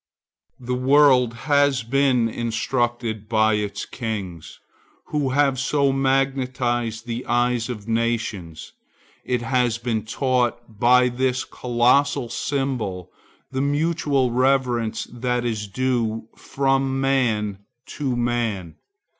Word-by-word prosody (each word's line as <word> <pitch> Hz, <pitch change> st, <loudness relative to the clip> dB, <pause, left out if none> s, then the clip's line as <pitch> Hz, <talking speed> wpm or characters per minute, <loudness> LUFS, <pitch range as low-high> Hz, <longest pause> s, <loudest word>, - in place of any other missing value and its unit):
The 125 Hz, 0 st, -4 dB
world 130 Hz, -2 st, +4 dB
has 145 Hz, -4 st, +3 dB
been 125 Hz, -1 st, +2 dB
instructed 115 Hz, -1 st, -2 dB
by 110 Hz, -1 st, +3 dB
its 105 Hz, -1 st, -2 dB
kings, 100 Hz, -9 st, -6 dB, 0.5 s
who 145 Hz, -3 st, 0 dB
have 135 Hz, -1 st, +2 dB
so 140 Hz, 0 st, +2 dB
magnetized 130 Hz, -4 st, 0 dB
the 120 Hz, 0 st, -4 dB
eyes 120 Hz, 0 st, +1 dB
of 110 Hz, -4 st, -6 dB
nations. 115 Hz, -8 st, -2 dB, 0.5 s
It 125 Hz, -1 st, -1 dB
has 120 Hz, -1 st, +1 dB
been 115 Hz, -2 st, -2 dB
taught 120 Hz, -2 st, -1 dB
by 125 Hz, +1 st, +5 dB
this 130 Hz, +1 st, 0 dB
colossal 125 Hz, +2 st, +1 dB
symbol 120 Hz, -12 st, -3 dB, 0.4 s
the 130 Hz, 0 st, -1 dB
mutual 145 Hz, -3 st, +1 dB
reverence 125 Hz, -3 st, +1 dB
that 125 Hz, 0 st, -1 dB
is 110 Hz, -3 st, -2 dB
due 115 Hz, -1 st, -1 dB
from 135 Hz, -1 st, 0 dB
man 115 Hz, -7 st, 0 dB, 0.4 s
to 135 Hz, -4 st, 0 dB
man. 115 Hz, -8 st, -2 dB
120 Hz, 105 wpm, -22 LUFS, 115-135 Hz, 0.5 s, by